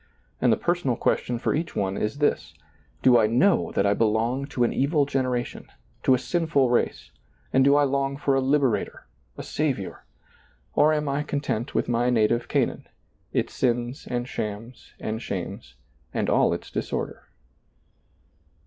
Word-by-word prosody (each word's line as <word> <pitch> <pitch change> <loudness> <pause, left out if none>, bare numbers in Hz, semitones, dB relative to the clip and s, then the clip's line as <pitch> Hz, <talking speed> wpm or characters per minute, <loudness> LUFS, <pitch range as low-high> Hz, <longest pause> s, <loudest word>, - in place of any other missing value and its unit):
And - - +4
the - - +3
personal 175 -8 0
ques - - +1
tion 120 - -3
for 115 - 0
each 160 +3 -3
one 95 -1 -1
is 105 +7 -2
this: 145 0 0 0.5
Do 125 -2 +6
I 110 - +4
know 165 - +3
that - - +1
I 100 - +4
be 110 - +1
long 115 +5 0
to 130 -3 -1
an 120 - +1
evil 140 +2 +2
generation, 130 -3 -2 0.3
to 130 - +4
a - - +1
sinful 150 -3 +1
race, 120 - 0 0.4
and 130 - +5
do 140 +1 +5
I 145 - +5
long 140 0 0
for 140 -1 +1
a 135 - +2
Liberator, 135 -3 0 0.3
a - - -6
Saviour? 135 -11 -2 0.7
or 150 - +4
am 150 -1 0
I 140 +1 0
content 140 -5 -3
with - - +1
my 120 +1 +1
native 120 0 +2
Canaan, - - -1 0.4
its - - -1
sins 120 +2 -1
and 120 0 -2
shams 110 +1 -6
and 110 +1 -4
shames 85 - -6 0.4
and - - 0
all - - +4
its - - -5
disorder - - -4
130 Hz, 165 wpm, -25 LUFS, 115-140 Hz, 0.7 s, Do